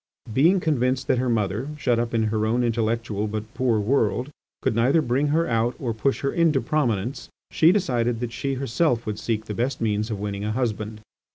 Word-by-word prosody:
Being 170 - +4
convinced 130 -5 0
that 125 - +3
her 125 0 0
mother, 110 +3 -1
shut 120 -5 +1
up 120 0 -1
in 115 -1 +1
her 110 -1 +1
own 120 +3 +1
intellectual 115 -2 -1
but 110 +2 -5
poor 120 -4 +1
world, 125 +4 +1 0.3
could - - +2
neither 125 +7 +3
bring 135 0 +1
her 160 +3 +1
out 115 +1 +1
or 120 -4 -2
push 110 +5 0
her 140 - -1
into 165 -5 +3
prominence, 125 -5 -1 0.2
she 160 +2 +5
decided 120 - 0
that 120 -1 -4
she 135 -1 -2
herself 130 -1 0
would 105 -1 -3
seek 110 -2 -2
the 105 - -5
best 125 +5 -1
means 110 -1 0
of 105 -3 -3
winning 100 0 -4
a 105 +1 -1
husband. 110 -3 -2
120 Hz, 200 wpm, -24 LUFS, 110-135 Hz, 0.3 s, she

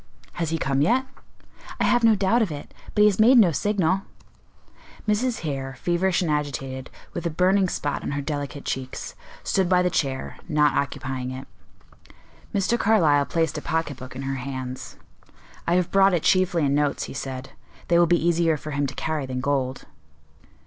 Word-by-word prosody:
"Has 165 -2 -2
he 165 - 0
come 135 -3 0
yet?" 250 - +3 0.7
"I - - +2
have 240 -1 +3
no 225 -1 +6
doubt 205 +4 +2
of 210 -7 0
it; 145 -1 -8 0.2
but 210 - +3
he - - +8
has 205 -1 +1
made 245 +4 +7
no 200 -7 +6
signal." 195 +1 +1 1.1
Mrs. 225 +3 0
Hare, 135 -4 -4
feverish 180 +1 +1
and 160 - 0
agitated, 135 -3 -3 0.2
with 170 0 -3
a - - 0
burning 185 +3 +2
spot 145 -3 -2
on - - -4
her 145 - -2
delicate 145 -1 -4
cheeks, 130 -1 -4 0.3
stood 190 -4 +1
by 180 -1 +4
the 180 - +1
chair, 135 -5 -2
not 150 -1 +3
occupying 130 -2 -2
it. 130 +1 -7 1.0
Mr. 200 +4 +1
Carlyle 160 -10 +3
placed 160 -2 0
a - - -11
pocket 160 -4 -2
book 130 0 -10
in 135 - -5
her 135 0 -2
hands. 130 -1 -6 0.7
"I 170 - +3
have 180 -1 +1
brought 195 -1 +5
it 165 - -1
chiefly 180 -4 +3
in 140 - +1
notes," 145 0 +1
he - - -7
said: 130 -1 -6 0.4
"they 170 0 +4
will 175 - +5
be 175 - +4
easier 165 -2 +2
for 150 +1 -7
him 140 0 0
to 130 - -8
carry 155 -4 -2
than 130 -1 -3
gold." 130 -1 -1
160 Hz, 185 wpm, -24 LUFS, 135-185 Hz, 1.1 s, he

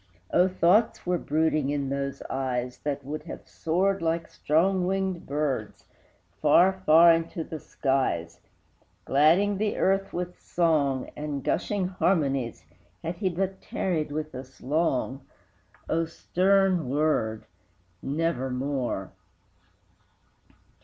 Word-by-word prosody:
O, 180 +1 +5
thoughts 185 +4 +2
were 180 -1 +1
brooding 155 -2 +1
in 140 -2 -1
those 140 0 -3
eyes, 125 -2 -3
That 145 -2 -3
would 150 +2 -4
have 165 - -9
soared 190 +4 0
like 165 0 -1
strong 180 +4 +1
winged 190 -2 -2
birds 140 -7 -2 0.6
Far, 170 +5 +5
far, 165 +2 +8
into 165 0 -2
the 160 0 -7
skies, 130 - -1 0.7
Gladding 175 +8 +3
the 210 -1 0
earth 195 +1 +1
with 180 0 -5
song, 150 -6 +1
And 150 -2 -4
gushing 200 -3 0
harmonies, 140 - 0 0.4
Had 165 +1 -4
he 190 +1 0
but 190 +2 -3
tarried 160 -6 -2
with 155 +1 -4
us 130 +1 -10
long! 135 -2 0 0.7
O 165 +1 +1
stern 185 -2 +1
word 135 -7 0 0.6
Nevermore! 135 - -2
155 Hz, 110 wpm, -27 LUFS, 140-180 Hz, 0.7 s, far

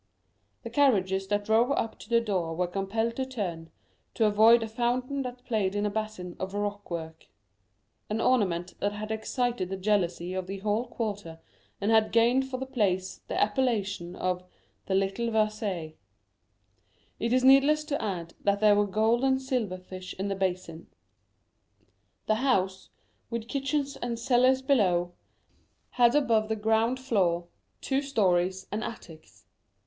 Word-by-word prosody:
The - - -7
carriages 195 -9 +2
that 205 0 -1
drove 225 +4 +3
up 225 -5 -2
to 215 - -13
the 235 -1 +4
door 185 -8 -2
were 180 +2 +1
compelled 200 +6 -2
to 265 - -1
turn, 175 -10 -4 0.5
to 225 - +3
avoid 220 +3 +6
a - - -3
fountain 245 +4 -1
that 250 -1 -7
played 205 -4 0
in 205 0 0
a 205 - 0
basin 210 -4 -4
of 190 +1 -4
rockwork,—an 160 - -7
ornament 185 -9 +1
that 205 0 0
had 215 +1 -5
excited 225 -2 -1
the 195 - -3
jealousy 185 -3 0
of 185 -1 -3
the 195 +1 -5
whole 210 +4 -1
quarter, 205 -8 -5 0.4
and 205 +2 0
had 220 -1 +4
gained 245 +3 +3
for 255 - -3
the 265 - -4
place 190 -7 -1
the - - -2
appellation 205 -6 0
of 180 0 -2 0.4
The 190 - +1
Little 195 +5 0
Versailles. 215 -7 -1 1.3
It 230 - -1
is 255 +1 +3
needless 275 +3 +6
to 295 -1 -3
add 175 -6 -4
that 200 0 +2
there 210 -1 +5
were 205 0 +2
gold 220 +5 +2
and 265 -1 +3
silver 250 -8 -2
fish 185 0 -9
in 195 +1 -2
the 195 - -1
basin. 185 -3 -3 1.4
The 215 - +2
house, 190 -8 0 0.4
with 230 -1 -4
kitchens 275 +1 -2
and 235 -1 -3
cellars 255 +2 +3
below, 180 -10 +2 0.8
had 240 0 +4
above 230 -7 +2
the 220 - +1
ground 220 +4 +1
floor, 180 -9 0 0.3
two 270 0 0
stories 190 -8 +1
and 215 +2 -2
attics. 160 -8 -10
210 Hz, 155 wpm, -28 LUFS, 185-240 Hz, 1.4 s, avoid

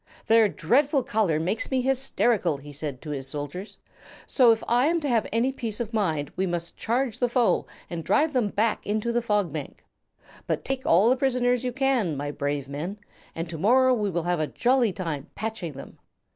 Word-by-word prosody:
"Their 225 -2 +5
dreadful 270 - +2
color 210 -10 +1
makes 185 +7 -2
me 260 -1 +1
hysterical," 245 - +1
he 145 +1 -11
said 145 -2 -5
to 150 - -6
his 135 -2 -4
soldiers, 145 +8 -6 0.5
"so 250 -4 +5
if 225 - 0
I 245 +4 +3
am 340 +1 +2
to 295 - -2
have 235 -4 +1
any 235 +4 +1
peace 230 -5 -4
of 230 -1 -4
mind 160 -10 0
we 190 +1 0
must 170 -1 -3
charge 245 0 -1
the 245 - +1
foe 240 -1 +2 0.2
and 170 -1 -5
drive 300 - +2
them 245 -5 +2
back 215 +2 0
into 215 +3 -1
the 240 +1 +1
Fog 210 -8 0
Bank. 150 -3 -7 0.6
But - - -2
take 270 -1 -3
all 185 +6 +5
the 255 - +5
prisoners 250 -2 +1
you 250 - -1
can, 245 - +1
my 145 +1 -3
brave 145 -1 -3
men, 155 +9 -5 0.4
and 165 +1 -3
to 160 - -6
morrow 255 +7 +4
we 210 -4 0
will 170 -2 -2
have 175 -1 0
a 155 - 0
jolly 245 - +2
time 165 -4 -5
patching 215 -7 -4
them. 135 - -11
215 Hz, 200 wpm, -26 LUFS, 165-245 Hz, 0.6 s, Their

